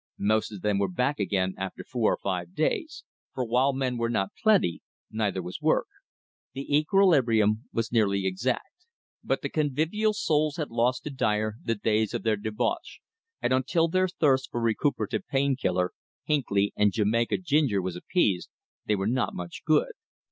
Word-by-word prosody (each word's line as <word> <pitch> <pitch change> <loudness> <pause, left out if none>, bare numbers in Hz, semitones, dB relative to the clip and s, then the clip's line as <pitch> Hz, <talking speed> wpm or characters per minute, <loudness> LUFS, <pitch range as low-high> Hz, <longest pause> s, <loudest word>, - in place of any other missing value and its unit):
Most 110 +2 +1
of 100 -4 -9
them 105 -2 +1
were 100 - +2
back 125 +11 -1
again 95 -2 0
after 95 0 -5
four 120 -4 0
or - - 0
five 90 -2 -3
days, 310 - -1 0.3
for, 130 - -1
while 125 +4 +2
men 130 -2 -2
were 115 0 0
not 100 -4 -1
plenty, 205 - +3 0.3
neither 105 -4 -1
was 90 +1 -7
work. - - +2 0.7
The 140 +1 -2
equilibrium 130 - +3
was 115 0 -2
nearly 100 -4 +2
exact. 110 +7 -2 0.5
But - - -1
the - - -2
convivial 160 +9 0
souls 155 -6 +1
had 155 -6 -4
lost 120 +2 +1
to 150 - -5
Dyer 110 -4 0
the 115 - 0
days 110 0 0
of - - -3
their 110 -1 +2
debauch, 110 - -3 0.4
and - - +2
until 165 +6 +2
their 185 +2 +2
thirst 140 -7 +1
for 120 - -3
recuperative 115 -1 0
"Pain 140 0 +1
Killer," 90 -7 0 0.3
"Hinckley" 100 -9 +1
and 105 -1 +3
Jamaica 115 +3 +1
Ginger 150 - +1
was 90 -1 -3
appeased, 95 - 0 0.4
they 105 - +3
were 95 -1 -2
not 125 +4 0
much 85 -1 -7
good. - - +3
115 Hz, 170 wpm, -27 LUFS, 100-145 Hz, 0.7 s, plenty